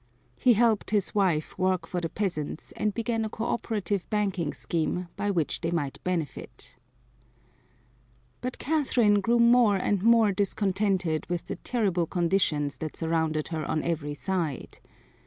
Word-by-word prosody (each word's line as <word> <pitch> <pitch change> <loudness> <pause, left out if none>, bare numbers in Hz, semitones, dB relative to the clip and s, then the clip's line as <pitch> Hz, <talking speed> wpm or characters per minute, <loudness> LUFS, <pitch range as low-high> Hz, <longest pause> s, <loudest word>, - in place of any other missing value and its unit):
He 250 - +5
helped 225 -1 +2
his 205 -2 +1
wife 180 -7 +1
work 185 -2 +1
for 180 +1 -3
the 165 - -2
peasants 165 -7 -3
and 210 - 0
began 225 +1 -1
a 220 - -2
cooperative 210 -4 -2
banking 195 -7 0
scheme 170 +2 -2
by 205 +1 -2
which 170 -7 0
they 165 - -1
might 150 -5 -3
benefit. 170 -6 -4 1.7
But 250 0 -4
Catherine 250 -9 +2
grew 235 +4 +2
more 235 -3 +5
and 195 0 0
more 225 -1 +5
discontented 195 -4 0
with 175 -1 -3
the - - -5
terrible 190 -9 0
conditions 165 -5 0
that 155 -1 -5
surrounded 160 -2 0
her 160 -2 -3
on 155 +2 -1
every 150 -3 -2
side. 170 -6 -3
190 Hz, 140 wpm, -27 LUFS, 165-215 Hz, 1.7 s, He